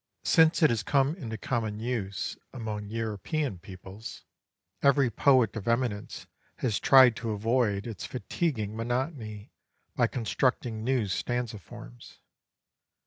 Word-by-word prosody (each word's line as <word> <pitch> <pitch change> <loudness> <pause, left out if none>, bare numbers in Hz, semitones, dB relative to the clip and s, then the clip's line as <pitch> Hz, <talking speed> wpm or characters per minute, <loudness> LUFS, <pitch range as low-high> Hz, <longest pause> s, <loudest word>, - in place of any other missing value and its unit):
Since 160 +1 +4
it 155 - +6
has 115 -3 0
come 140 +3 +2
into 115 -11 -6
common 110 -2 -2
use 110 -5 -3 0.2
among 110 -4 -5
European 115 - -3
peoples, 95 +4 -10 0.6
every 140 -3 +4
poet 125 -3 +3
of 110 -1 -6
eminence 115 -3 -1 0.3
has 115 -5 -1
tried 130 -4 +7
to 115 - -4
avoid 110 -1 +1
its 105 -8 -6
fatiguing 120 - -2
monotony, 115 -3 -3 0.4
by - - +3
constructing 120 -1 -1
new 125 -2 +1
stanza 115 +3 -2
forms. - - -13
115 Hz, 120 wpm, -28 LUFS, 105-130 Hz, 0.6 s, tried